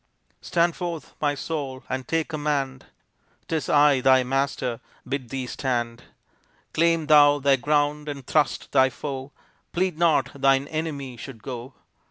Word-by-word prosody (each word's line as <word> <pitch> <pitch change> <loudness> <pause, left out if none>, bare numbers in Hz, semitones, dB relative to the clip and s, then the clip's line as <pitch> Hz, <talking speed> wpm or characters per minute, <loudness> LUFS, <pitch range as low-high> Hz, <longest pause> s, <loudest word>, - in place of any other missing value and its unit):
Stand 170 -1 +1
forth, 170 -3 -5
my 145 -1 +1
soul, 140 -3 -4
and 130 0 -4
take 165 -1 0
command. 145 -4 -2 0.6
'Tis 160 -3 -2
I, 145 -2 +5
thy 130 0 +5
master, 130 -2 -1 0.3
bid 135 -3 -3
thee 135 -1 -3
stand. 120 -2 -3 0.7
Claim 165 -1 +2
thou 145 -1 +6
thy 140 -1 +3
ground 150 +2 0
and 140 -3 -6
thrust 150 +1 0
thy 130 0 +5
foe, 135 +1 -6 0.4
Plead 180 -2 0
not 170 -3 +3
thine 135 0 +3
enemy 145 -5 -4
should 115 -2 -10
go. 125 0 -7
140 Hz, 140 wpm, -25 LUFS, 130-155 Hz, 0.7 s, thou